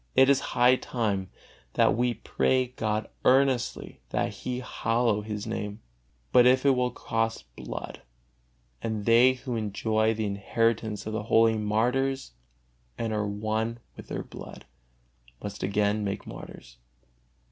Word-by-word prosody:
It 135 Hz, +1 st, +7 dB
is 135 Hz, -, +4 dB, 0.2 s
high 125 Hz, +1 st, +6 dB
time 100 Hz, -8 st, -2 dB, 0.4 s
that -, -, +4 dB
we 120 Hz, 0 st, +1 dB
pray 130 Hz, +3 st, +1 dB
God 110 Hz, -3 st, -2 dB, 0.2 s
earnestly 130 Hz, -2 st, +2 dB
that -, -, 0 dB
He 125 Hz, -1 st, -4 dB
hallow 115 Hz, -3 st, 0 dB
His 105 Hz, -1 st, -5 dB
Name. 105 Hz, -1 st, -4 dB, 0.5 s
But 125 Hz, 0 st, +7 dB
it 130 Hz, +1 st, +4 dB
will 125 Hz, -2 st, +3 dB
cost 115 Hz, -, -3 dB
blood, -, -, -7 dB, 0.8 s
and 110 Hz, -2 st, -3 dB
they 120 Hz, +3 st, +6 dB
who 125 Hz, -1 st, -5 dB
enjoy 110 Hz, +1 st, 0 dB
the 110 Hz, 0 st, -2 dB
inheritance 105 Hz, +2 st, 0 dB
of 110 Hz, -, -4 dB
the 110 Hz, -, -1 dB
holy 115 Hz, 0 st, +5 dB
martyrs 125 Hz, -, 0 dB, 0.7 s
and 115 Hz, -1 st, -2 dB
are 105 Hz, -1 st, 0 dB
won 110 Hz, +3 st, -2 dB, 0.2 s
with -, -, -11 dB
their -, -, -4 dB
blood, -, -, -11 dB, 0.8 s
must 100 Hz, -1 st, -6 dB
again 105 Hz, +2 st, +1 dB
make 100 Hz, 0 st, -3 dB
martyrs. -, -, -10 dB
110 Hz, 135 wpm, -27 LUFS, 105-125 Hz, 0.8 s, It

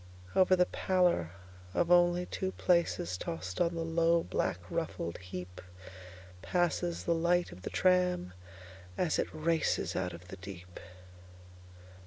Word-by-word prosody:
Over 185 Hz, 0 st, +5 dB
the 180 Hz, 0 st, +4 dB
pallor 180 Hz, -, +1 dB, 0.5 s
of 175 Hz, 0 st, +1 dB
only 175 Hz, 0 st, +5 dB
two 190 Hz, +1 st, -3 dB
placesTossed 90 Hz, -, 0 dB
on 170 Hz, 0 st, -1 dB
the 165 Hz, 0 st, -2 dB
low, 165 Hz, 0 st, +2 dB
black, -, -, -1 dB
ruffled 155 Hz, -, -3 dB
heapPasses 90 Hz, -, -4 dB
the 170 Hz, -, +3 dB
light 170 Hz, +1 st, +1 dB
of 90 Hz, -, -11 dB
the -, -, -5 dB
tram 180 Hz, -, +2 dB, 0.6 s
as 175 Hz, -4 st, +1 dB
it -, -, +1 dB
racesOut 155 Hz, -, 0 dB
of 85 Hz, +2 st, -12 dB
the -, -, -8 dB
deep. 90 Hz, -1 st, -10 dB
165 Hz, 120 wpm, -32 LUFS, -, 0.6 s, Over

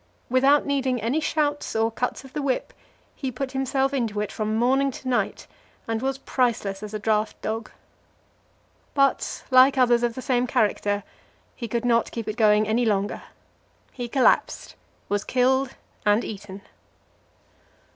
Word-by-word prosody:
Without 270 Hz, +3 st, +4 dB
needing 265 Hz, -3 st, 0 dB
any 235 Hz, +8 st, 0 dB
shouts 295 Hz, -3 st, -1 dB
or 225 Hz, +1 st, +2 dB
cuts 250 Hz, +3 st, -3 dB
of 270 Hz, -, -14 dB
the 295 Hz, -, -2 dB
whip, 270 Hz, -2 st, -1 dB, 0.4 s
he 265 Hz, -2 st, -4 dB
put 260 Hz, +2 st, -4 dB
himself 270 Hz, 0 st, 0 dB
into 230 Hz, -6 st, -1 dB
it 210 Hz, -1 st, -2 dB
from 215 Hz, 0 st, -2 dB
morning 265 Hz, +4 st, +2 dB
to 260 Hz, 0 st, -8 dB
night, 250 Hz, -1 st, -1 dB, 0.4 s
and 225 Hz, 0 st, -1 dB
was 270 Hz, 0 st, -1 dB
priceless 230 Hz, -7 st, -1 dB
as 210 Hz, -1 st, -7 dB
a -, -, 0 dB
draught 215 Hz, 0 st, 0 dB
dog. 220 Hz, 0 st, -3 dB, 1.3 s
But, 275 Hz, -1 st, +1 dB
like 260 Hz, +2 st, +6 dB
others 240 Hz, -2 st, +4 dB
of 240 Hz, -1 st, 0 dB
the 255 Hz, -, -5 dB
same 250 Hz, -1 st, +1 dB
character, 205 Hz, -2 st, 0 dB, 0.5 s
he 235 Hz, -, -5 dB
could 235 Hz, +2 st, -2 dB
not 235 Hz, -1 st, +2 dB
keep 230 Hz, -2 st, -6 dB
it 215 Hz, -, -3 dB
going 215 Hz, -2 st, +4 dB
any 225 Hz, +3 st, +1 dB
longer; 205 Hz, -3 st, 0 dB, 0.7 s
he 245 Hz, -2 st, -5 dB
collapsed, 260 Hz, +2 st, +2 dB, 0.3 s
was 205 Hz, 0 st, -1 dB
killed 260 Hz, +1 st, +1 dB, 0.3 s
and 210 Hz, +3 st, +3 dB
eaten. 200 Hz, -1 st, -8 dB
245 Hz, 155 wpm, -24 LUFS, 215-265 Hz, 1.3 s, like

